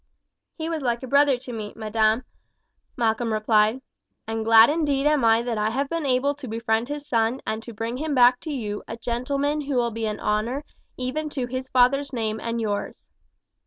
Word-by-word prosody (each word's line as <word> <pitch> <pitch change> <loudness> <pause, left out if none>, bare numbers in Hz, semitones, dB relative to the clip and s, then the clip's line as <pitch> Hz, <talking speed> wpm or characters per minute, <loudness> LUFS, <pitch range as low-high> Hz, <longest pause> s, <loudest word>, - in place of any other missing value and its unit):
"He 320 -1 -4
was 325 -2 -2
like 240 -1 -1
a - - -5
brother 280 0 +4
to 245 0 -9
me, 215 -2 -6
madam," 220 +1 +1 0.7
Malcolm 225 0 0
replied; 215 +3 +2 0.4
"and 225 0 -3
glad 225 0 +8
indeed 290 -3 0
am 300 -3 +3
I 225 0 +4
that 235 -3 -2
I 210 +1 +1
have 275 +5 -2
been 330 -3 -2
able 265 +2 +2
to 280 -3 -8
befriend 225 +1 -1
his 290 0 -5
son 230 +2 +1
and 220 +1 -2
to 235 - -9
bring 230 +2 -4
him 300 +1 -2
back 245 0 +6
to 315 - -6
you 210 -7 -4
a 225 - -6
gentleman 275 +6 -1
who 285 -1 -3
will 240 -1 +1
be 225 0 -3
an 210 0 -3
honour 225 +7 -1 0.3
even 275 +5 -3
to 265 -4 -3
his 255 +1 -5
father's 260 +3 +3
name 220 -2 -2
and 230 0 -2
yours." 205 -2 -3
240 Hz, 200 wpm, -24 LUFS, 225-275 Hz, 0.7 s, glad